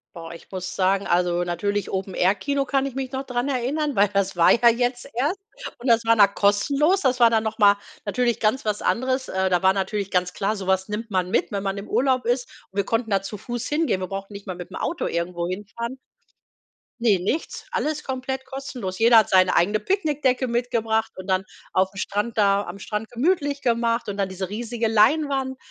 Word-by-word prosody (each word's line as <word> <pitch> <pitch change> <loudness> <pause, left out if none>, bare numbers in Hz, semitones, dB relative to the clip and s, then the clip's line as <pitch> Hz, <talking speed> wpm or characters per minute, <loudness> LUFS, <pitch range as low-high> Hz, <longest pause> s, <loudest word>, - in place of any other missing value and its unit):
Boah, 165 -1 -8
ich 170 - -13
muss 185 -1 -5
sagen, 195 +1 +1
also, 175 0 +1
natürlich 200 +4 -2
Open 190 0 -3
Air 185 +2 +3
Kino 280 +7 -1
kann 270 0 +1
ich 270 -2 -5
mich 265 -1 -4
noch 265 0 -3
dran 250 +1 -2
erinnern, 280 +3 -1
weil 200 +1 +5
das 195 -1 0
war 170 -1 +5
ja 235 0 +6
jetzt 245 +1 -1
erst 285 +11 0 0.4
und 245 - -6
das 230 0 +4
war 230 - +5
dann 200 -2 +5
kostenlos. 280 - +2
Das 255 -3 +1
war 235 -1 +7
dann 225 -1 +2
noch 220 0 -3
mal 205 -1 +6 0.3
natürlich 240 +3 0
ganz 225 +4 +1
was 210 -1 -1
anderes, 260 +2 0
äh, 190 0 0
da 180 -1 +2
war 190 0 +5
natürlich 200 +1 -2
ganz 180 -1 0
klar, 205 +2 -1
so 195 -2 -6
was 190 0 +1
nimmt 215 +2 -5
man 185 -2 0
mit, - - 0
wenn 200 -1 -2
man 195 0 -2
im 200 - -7
Urlaub 255 -2 +1
ist. 245 +2 0 0.2
Wir 200 +1 0
konnten 225 0 -1
da 195 -1 +2
zu 205 +2 -7
Fuß 240 +3 -5
hingehen, 295 - 0
wir 185 - -3
brauchten 195 +2 -6
nicht 200 0 -10
mal 185 - -4
mit 175 -1 -9
dem - - -7
Auto - - -2
irgendwo 170 0 -2
hinfahren. 210 +7 -5 1.0
Ne, 215 -5 +3
nichts, 230 - -3
alles 305 0 -2
komplett 265 0 -4
kostenlos. 260 -8 -6
Jeder 230 +1 +6
hat 215 - +1
seine 185 -1 +4
eigene 205 +5 +3
Picknickdecke 290 - 0
mitgebracht 230 -2 0
und 185 0 -9
dann 190 0 +1 0.3
auf'm 190 +1 +1
Strand 210 +4 -2
da 200 -1 +3
am 180 +2 -8
Strand 210 +2 -5
gemütlich 285 +2 0
gemacht 235 -2 0
und 200 - -4
dann 195 -1 0
diese 190 -1 -5
riesige 230 +2 -2
Leinwand. 265 +4 +2
220 Hz, 210 wpm, -23 LUFS, 195-255 Hz, 1.0 s, war